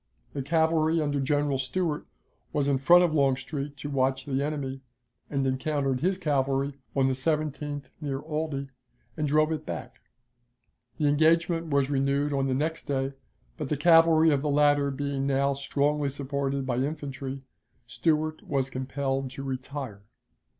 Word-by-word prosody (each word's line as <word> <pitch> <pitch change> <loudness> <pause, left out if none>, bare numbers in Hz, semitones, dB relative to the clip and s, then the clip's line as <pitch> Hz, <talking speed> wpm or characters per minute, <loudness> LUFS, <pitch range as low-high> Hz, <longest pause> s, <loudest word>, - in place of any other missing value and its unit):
The 140 - -3
cavalry 160 +2 +2
under 145 -2 0
General 145 0 +1
Stuart 150 +4 -2 0.4
was 145 -1 0
in 140 -2 +2
front 175 +6 +7
of 170 -3 +1
Longstreet 140 0 0
to 145 - -5
watch 130 -1 +1
the 140 0 -1
enemy, 140 -3 -3 0.5
and 135 -2 0
encountered 135 0 0
his 185 +5 +1
cavalry 140 -3 0 0.2
on 135 -1 +3
the 135 - +2
17th 145 0 -1 0.2
near 140 -3 -2
Aldie, 150 -2 -3 0.5
and 150 -2 -1
drove 155 +2 +3
it 160 - -2
back. 85 -2 -7 1.0
The 150 - 0
engagement 165 +3 +3
was 140 -2 +1
renewed 140 +1 +1
on 135 -1 +1
the 130 - 0
next 160 +4 -2
day, 135 -1 -1 0.4
but 150 -3 -4
the 150 - 0
cavalry 165 0 +6
of 140 -2 +2
the 150 - -1
latter 145 0 +3
being 140 0 -2
now 140 0 +2
strongly 140 +1 0
supported 140 0 -2
by 125 -2 -1
infantry, 135 -1 -4 0.4
Stuart 155 +6 0
was 135 -2 -1
compelled 135 0 -2
to 135 +2 -7
retire. 130 -4 -5
140 Hz, 150 wpm, -27 LUFS, 135-150 Hz, 1.0 s, front